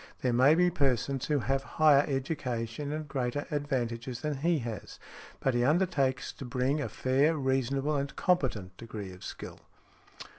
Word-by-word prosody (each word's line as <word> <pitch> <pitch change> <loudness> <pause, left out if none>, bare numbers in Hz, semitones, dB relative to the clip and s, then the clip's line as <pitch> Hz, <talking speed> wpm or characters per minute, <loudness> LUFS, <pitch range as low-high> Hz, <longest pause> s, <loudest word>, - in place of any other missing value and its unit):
There 125 -2 +2
may 130 +6 +6
be 180 +1 +4
persons 135 -4 0
who 150 - +2
have 135 +2 0 0.2
higher 150 -3 +6
education 135 -2 -3
and 155 0 -4
greater 135 0 -2
advantages 125 -4 -2
than 150 -2 -2
he 165 +4 +2
has, 115 -6 -6 0.4
but 135 - +1
he 120 0 +2
undertakes 140 -4 +1
to - - -9
bring 130 +3 0
a - - -3
fair, 140 +5 +2
reasonable 135 +2 0
and 140 0 -2
competent 120 - 0
degree 105 -4 -7
of 90 0 -12
skill." - - -8
135 Hz, 155 wpm, -30 LUFS, 125-150 Hz, 0.4 s, may